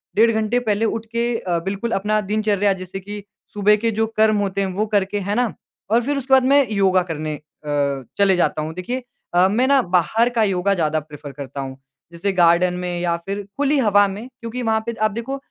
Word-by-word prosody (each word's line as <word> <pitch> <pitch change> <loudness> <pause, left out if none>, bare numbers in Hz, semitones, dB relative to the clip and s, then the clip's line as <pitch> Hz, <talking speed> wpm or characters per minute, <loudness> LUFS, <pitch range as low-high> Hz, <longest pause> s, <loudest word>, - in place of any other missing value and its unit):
डेढ़ 230 +2 +5
घंटे 220 +2 +1
पहले 220 -2 0
उठके 235 +2 -2
अ, 175 -4 -1
बिल्कुल 200 +4 -3
अपना 210 +1 +1
दिनचर्या 205 -1 +1
जैसे 185 0 -7
कि 205 +1 -8 0.3
सुबह 210 0 +4
के 230 +2 0
जो 225 +1 0
कर्म 215 -1 +4
होते 200 -1 -1
हैं 195 - 0
वो 210 +3 0
करके, 205 -1 0
है 200 +1 -2
ना? 245 -2 0 0.4
और 230 +2 +3
फिर 285 +2 -1
उसके 265 0 -1
बाद 265 -1 +6
मैं 280 -1 +4
योगा 190 -2 +3
करने 155 0 -3
अ, - - -11 0.8
चले 200 -2 +4
जाता 170 -3 +1
हूँ। 155 +1 -4
देखिए 240 +9 -4 0.3
अ, 180 +1 +6
मैं 235 +7 +1
ना 275 -1 +5
बाहर 185 +6 +2
का 220 - +4
योगा 195 0 +1
ज़्यादा 155 -3 0
प्रेफ़र 150 -1 -10
करता 140 0 -7
हूँ। 135 0 -7 0.3
जैसे 175 +4 -2
गार्डन 175 0 +4
में 180 -1 -3
या 170 -1 0
फिर 200 +1 -4
खुली 285 +1 +2
हवा 205 -4 +4
में 205 +5 -7
क्योंकि 230 +2 -5
वहाँ 220 -1 +1
पे 235 - -2
आप 215 -1 +3
देखो 235 +6 -4
205 Hz, 215 wpm, -21 LUFS, 185-225 Hz, 0.8 s, बाद